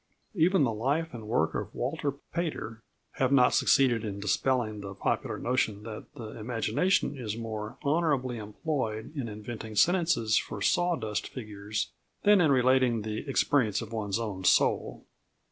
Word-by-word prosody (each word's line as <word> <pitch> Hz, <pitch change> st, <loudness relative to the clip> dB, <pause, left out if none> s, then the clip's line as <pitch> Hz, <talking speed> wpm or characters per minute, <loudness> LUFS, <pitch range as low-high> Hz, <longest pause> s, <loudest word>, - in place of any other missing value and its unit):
Even 180 Hz, -2 st, +3 dB
the 115 Hz, -4 st, +1 dB
life 145 Hz, +9 st, -1 dB
and 110 Hz, -3 st, -8 dB
work 80 Hz, -8 st, +1 dB
of -, -, -4 dB
Walter 145 Hz, +3 st, -1 dB, 0.2 s
Pater 150 Hz, -9 st, -3 dB, 0.4 s
have 130 Hz, 0 st, +2 dB
not 125 Hz, -3 st, +5 dB
succeeded 125 Hz, -5 st, +4 dB
in 100 Hz, -2 st, -4 dB
dispelling 110 Hz, +1 st, 0 dB
the 100 Hz, -1 st, -7 dB
popular -, -, -1 dB
notion 110 Hz, -5 st, 0 dB
that 110 Hz, -1 st, -7 dB
the 110 Hz, -1 st, -8 dB
imagination 115 Hz, -, +1 dB
is 115 Hz, -5 st, -4 dB
more 110 Hz, -1 st, -5 dB
honourably 140 Hz, -6 st, +1 dB
employed 110 Hz, +2 st, -3 dB
in 135 Hz, -5 st, -3 dB
inventing 110 Hz, +1 st, -7 dB
sentences 165 Hz, -, +3 dB
for -, -, -6 dB
sawdust 135 Hz, -, 0 dB
figures 105 Hz, -3 st, -5 dB, 0.3 s
than 205 Hz, -2 st, +6 dB
in 155 Hz, -4 st, +4 dB
relating 130 Hz, -3 st, +3 dB
the 110 Hz, +6 st, -4 dB
experiences 125 Hz, -6 st, +2 dB
of 115 Hz, 0 st, -10 dB
one's 105 Hz, -2 st, -1 dB
own 105 Hz, -5 st, -4 dB
soul. -, -, +2 dB
115 Hz, 145 wpm, -29 LUFS, 105-140 Hz, 0.4 s, than